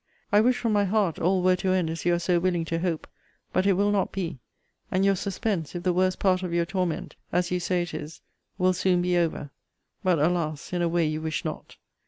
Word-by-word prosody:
I 205 +1 +6
wish 245 +2 +3
from 230 -3 0
my 205 -1 +3
heart 195 -4 +1
all 185 +2 +2
were 185 0 +5
to 185 0 0
end 185 -3 +1
as 165 - -6
you 175 0 +4
are - - 0
so 175 0 +1
willing 175 -2 0
to 165 0 -2
hope: 170 -2 -2 0.5
but 190 - +2
it 200 - +5
will 200 +2 +2
not 200 -2 +1
be; 175 -8 -4 0.5
and 190 +1 +1
your 195 0 +4
suspense, 190 -3 -2
if 175 - -4
the 180 - +2
worst 185 +1 +2
part 185 -2 +2
of 180 -2 -4
your 170 0 +1
torment, 180 -1 -2 0.2
as 180 0 0
you 180 - +1
say 180 0 0
it 175 - -7
is, 155 +1 -7 0.4
will 185 -1 +3
soon 180 0 +2
be 180 0 +1
over; 165 -4 0 0.5
but, 185 -3 +3
alas! 155 0 -1
in 175 - 0
a 170 - +2
way 170 0 +2
you 155 0 -2
wish 160 -1 -3
not. - - -6
180 Hz, 240 wpm, -26 LUFS, 170-190 Hz, 0.5 s, I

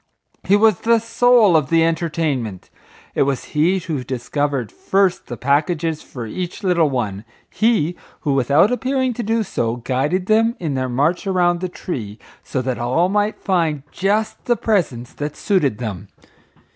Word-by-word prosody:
He 195 - +4
was 215 -3 +4
the 230 0 +3
soul 230 -3 +4
of 150 -4 +2
the 165 0 +4
entertainment. 155 - -2 0.4
It - - 0
was 135 -2 +1
he 165 +5 +3
who 160 -7 -4
discovered 130 -1 -2
first 195 -2 0
the 120 - -6
packages 155 - 0
for 120 -3 -8
each 180 - -5
little 170 -5 +3
one; 110 -7 -3 0.3
he 195 -6 +1 0.3
who, 145 -4 0
without 140 - +3
appearing 260 0 0
to 240 - -4
do 225 0 0
so, 115 - -2
guided 135 +9 -1
them 225 +3 +3
in 160 -5 -2
their 130 -1 -1
march 150 - 0
around 175 -2 +2
the 185 0 -3
tree, 110 - -6 0.3
so 130 - -3
that 130 -1 -2
all 130 +10 +1
might 210 +1 0
find 165 -7 0
just 210 +3 -1
the 240 -1 +2
presents 145 - -1
that 145 0 -5
suited 165 - +1
them. 105 -7 -5
165 Hz, 160 wpm, -20 LUFS, 130-195 Hz, 0.4 s, He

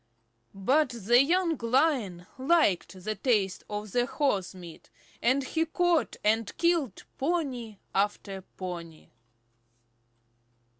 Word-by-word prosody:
But 265 +9 +2
the 240 +1 +3
young 335 +2 +2
Lion 230 - +1
liked 260 - +2
the 215 - -1
taste 205 -4 0
of 210 -1 -5
horse 245 -6 0
meat, 175 -3 -12 0.3
and 260 +3 +2
he 320 +5 0
caught 350 0 +1
and 220 0 +1
killed 335 - +1 0.2
pony 265 - -2 0.2
after 195 -1 -1
pony. 175 -4 -8
235 Hz, 100 wpm, -28 LUFS, 195-295 Hz, 0.3 s, the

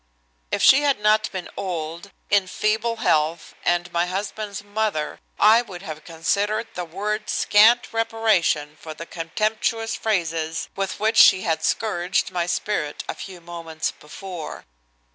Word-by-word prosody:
If - - -1
she 270 +2 +7
had 285 -5 +2
not 215 +1 +2
been 185 -2 -5
old, 170 -1 -4 0.2
in 200 -2 +4
feeble 220 +4 0
health 160 -6 0
and 175 0 0
my 170 +1 +1
husband's 205 +2 -4
mother, 205 -7 -2 0.2
I 220 +3 +7
would 190 -6 -10
have 155 -4 -7
considered 200 +7 -1
the 180 - -4
words 210 +5 -3
scant 230 +4 +4
reparation 215 -10 +1
for 155 -1 -8
the 165 - -7
contemptuous 215 +7 -1
phrases 165 -6 -1
with 195 -1 -3
which 220 +2 +1
she 185 - +8
had 160 -1 -1
scourged 190 -2 0
my 175 -2 -1
spirit 165 -6 -2
a - - -2
few 185 -3 -9
moments 165 -2 -4
before. 175 +2 -8
190 Hz, 145 wpm, -23 LUFS, 165-215 Hz, 0.2 s, she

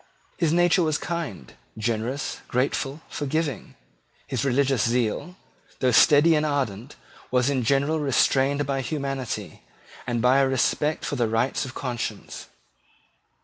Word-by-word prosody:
His 165 -3 +1
nature 175 +2 +3
was 155 -2 +1
kind, 160 - -5 0.2
generous, 115 +5 -2
grateful, 135 +3 -1
forgiving. 145 -2 -3 0.5
His - - -2
religious 135 -4 +2
zeal, 125 +9 -1 0.4
though 130 -1 +2
steady 150 +6 +6
and 150 -1 +2
ardent, 135 -5 -2 0.3
was 125 +2 +2
in 135 -2 0
general 140 +6 +1
restrained 140 0 +2
by 135 0 -1
humanity, 130 - -4 0.5
and 120 -1 -1
by 125 +3 +4
a 135 - +3
respect 145 +4 0
for 145 - -3
the 120 -2 +1
rights 115 +5 0
of 130 - -9
conscience. 125 -3 -5
135 Hz, 130 wpm, -25 LUFS, 120-145 Hz, 0.5 s, steady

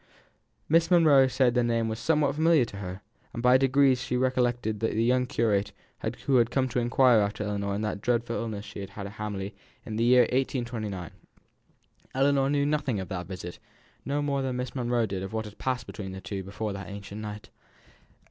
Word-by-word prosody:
Miss 165 +1 +3
Monro 155 -7 +6
said 130 -1 +2
that 125 - +2
the - - +3
name 115 -1 +1
was 110 0 -3
somehow 150 -3 +2
familiar 155 -2 +3
to 100 - -10
her, 95 0 -7 0.3
and 115 - -4
by 125 +1 +6
degrees 135 -1 +4
she 130 -1 -1
recollected 120 -4 0
the 110 -1 -1
young 125 +2 +2
curate 105 -5 0 0.5
who 135 -2 +4
had 120 -1 +3
come 130 0 +1
to 125 - 0
inquire 120 0 +4
after 105 +1 -1
Ellinor 100 -1 -2
in 105 - -2
that 105 -2 -3
dreadful 120 0 0
illness 110 -3 -4
she - - -9
had 100 - -6
had 100 - -7
at 100 - -7
Hamley 100 -1 -4 0.3
in 110 -1 -5
the 115 - +1
year 125 +1 +6
1829. 120 - -2 1.0
Ellinor 135 0 +3
knew 140 0 +2
nothing 145 -7 0
of 95 -2 -6
that 90 -1 -4
visit; 90 -2 -7 0.4
no 145 +1 -1
more 140 -1 0
than 130 -1 -2
Miss 125 0 -4
Monro 120 -2 0
did 95 -3 -4
of 95 +3 -6
what 110 0 -2
had 105 0 -11
passed 125 -3 -2
between 95 -4 -7
the 95 - -6
two 100 -1 -5
before 100 +2 -4
that 95 0 -7
anxious 100 0 -8
night. 105 0 -7
120 Hz, 205 wpm, -27 LUFS, 105-130 Hz, 1.0 s, Monro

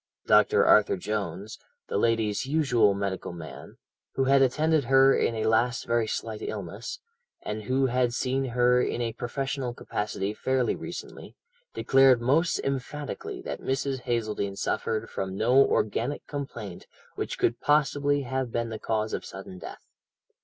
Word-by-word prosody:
Dr. - - +5
Arthur 105 -2 +5
Jones, 100 0 -4 0.3
the - - -2
lady's 110 0 +1
usual 125 -9 +3
medical 100 -2 -3
man, 85 -2 -10 0.4
who 135 - +2
had 135 +1 +4
attended 150 +2 +2
her 135 +2 +5
in 115 - +1
a 110 - -2
last 115 +2 +1
very 115 -1 +1
slight 110 0 -4
illness, - - -6 0.4
and 105 0 -5
who 130 +3 +2
had 125 -1 +1
seen 130 +2 -1
her 125 0 +3
in - - -1
a 115 -2 -2
professional 130 +1 -3
capacity 105 -2 -3
fairly 130 +2 0
recently, - - -8 0.4
declared 135 -2 +5
most 145 +8 +2
emphatically 150 - -4
that - - -5
Mrs. 135 0 -1
Hazeldene 110 -5 -2
suffered 110 +2 -2
from 95 0 -4
no 125 +6 +5
organic 115 +6 -1
complaint 120 -10 -7 0.3
which - - -4
could 115 +1 +1
possibly 145 -1 +2
have 130 -1 -3
been 115 0 -2
the 110 -1 -6
cause 110 -1 -1
of - - -3
sudden 95 -1 -9
death. - - -10
120 Hz, 145 wpm, -27 LUFS, 110-135 Hz, 0.4 s, Dr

